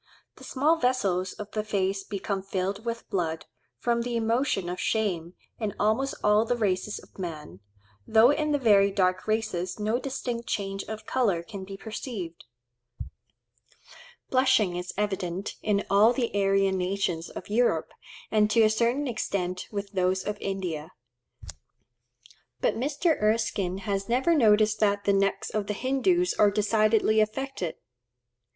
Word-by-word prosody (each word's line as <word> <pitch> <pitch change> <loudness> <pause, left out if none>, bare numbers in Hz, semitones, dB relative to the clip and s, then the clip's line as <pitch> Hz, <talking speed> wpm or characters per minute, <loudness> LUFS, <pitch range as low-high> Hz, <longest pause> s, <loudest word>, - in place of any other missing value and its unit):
—The - - -14
small 300 +5 +2
vessels 195 - 0
of 210 0 -9
the 215 - -2
face 195 -2 -1
become 195 0 -3
filled 195 +2 -3
with 230 0 -4
blood, 165 -4 -2 0.3
from 235 - 0
the 240 0 -3
emotion 230 -4 0
of 180 +1 -4
shame, 185 -6 -1 0.2
in 215 -3 -3
almost 220 +6 +1
all 210 +1 +4
the 235 +2 0
races 205 -1 -1
of - - -15
man, 155 - -6 0.5
though 225 +4 +6
in 300 +1 0
the 290 - +3
very 205 -6 +5
dark 185 -1 0
races 210 -5 -1
no 215 +3 0
distinct 245 -3 -4
change 195 -1 -2
of 215 0 -7
colour 205 -10 +1
can 200 0 -8
be 195 0 -8
perceived. 210 -6 -6 1.9
Blushing 255 -8 +3
is 180 +1 -4
evident 195 -2 -2
in 205 -1 +1
all 205 +4 +5
the 245 -2 -1
Aryan 195 -1 +2
nations 180 -3 -1
of - - -9
Europe, 210 -7 +1 0.4
and 210 -1 +3
to 225 +1 +4
a 215 - +4
certain 235 +6 +1
extent 185 -6 -2
with 200 -1 -4
those 185 -1 +1
of 210 - -3
India. 180 -4 -4 1.7
But - - +1
Mr. 295 +5 0
Erskine 210 -4 +1
has 195 +1 -2
never 260 +8 +3
noticed 215 -6 +4
that 205 -1 +2
the 200 - +2
necks 195 0 0
of 210 -2 -2
the 210 - -2
Hindoos 345 - +1
are 210 - +6
decidedly 215 +1 +2
affected. 215 -5 -2
210 Hz, 145 wpm, -27 LUFS, 190-230 Hz, 1.9 s, though